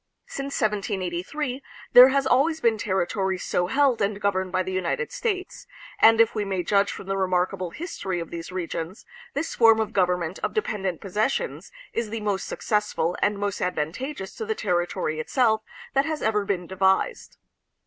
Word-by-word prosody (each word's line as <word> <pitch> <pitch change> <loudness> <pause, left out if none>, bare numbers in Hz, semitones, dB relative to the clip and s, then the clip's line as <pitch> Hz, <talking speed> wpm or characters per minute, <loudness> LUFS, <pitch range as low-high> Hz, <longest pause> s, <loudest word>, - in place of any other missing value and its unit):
Since 275 0 -4
1783 210 - -2 0.3
there 250 +1 +11
has 275 0 +1
always 305 +5 +3
been 230 -6 +2
territory 190 -1 0
so 180 0 -1
held 270 +1 +2
and 200 0 0
governed 190 -2 0
by 185 0 +1
the 185 - -5
United 185 - -1
States, 420 -7 -3 0.3
and 225 0 +7
if 230 -1 +5
we 215 - -1
may 190 -3 -2
judge 200 +2 +2
from - - -8
the 195 +1 -2
remarkable 185 -1 0
history 190 - -4
of 165 - -6
these 170 +1 -6
regions, 175 +1 -5 0.3
this 290 +4 -2
form 225 -1 +6
of 220 - -1
government 180 -2 0
of - - -3
dependent 195 - -2
possessions 215 - -2 0.2
is 230 -2 -2
the 225 0 -4
most 205 -2 -1
successful 210 -5 -1
and 205 0 +2
most 200 -1 -2
advantageous 190 - -3
to 450 - -4
the 440 - 0
territory 175 - -1
itself 220 +6 +2 0.3
that 275 - +3
has 315 -1 -3
ever 210 -2 +1
been 185 -3 -1
devised. 190 - 0
200 Hz, 170 wpm, -25 LUFS, 185-245 Hz, 0.3 s, there